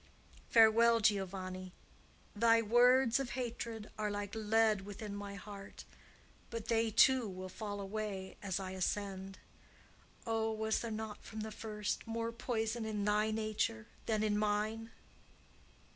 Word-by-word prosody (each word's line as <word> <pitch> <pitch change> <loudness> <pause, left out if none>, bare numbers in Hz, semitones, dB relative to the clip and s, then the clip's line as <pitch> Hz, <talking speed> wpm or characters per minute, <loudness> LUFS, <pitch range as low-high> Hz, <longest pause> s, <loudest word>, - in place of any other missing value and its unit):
Farewell, 230 +1 +6
Giovanni! 185 -3 -1 0.6
Thy 230 +2 +5
words 240 +2 +5
of 270 -3 -3
hatred 230 -3 -4
are 210 0 0
like 205 -1 -4
lead 220 -1 +3
within 205 +1 -7
my 200 0 -6
heart; 200 -1 -10 0.6
but 230 -2 -6
they, 225 -1 +3
too, 250 +1 +5
will 185 0 -7
fall 205 +1 -5
away 200 -1 -4
as 195 -1 -2
I 190 -1 -5
ascend. 190 0 -3 0.9
Oh, 225 -1 0
was 220 0 0
there 235 - -4
not, 220 -1 -5
from 220 -1 -7
the 220 0 -5
first, 210 0 -4
more 230 0 -2
poison 230 -1 -2
in 210 -2 -2
thy 210 +1 +2
nature 215 0 -1 0.2
than 215 -1 +1
in 210 -1 +1
mine?" 215 +2 0
215 Hz, 135 wpm, -35 LUFS, 205-225 Hz, 0.9 s, Farewell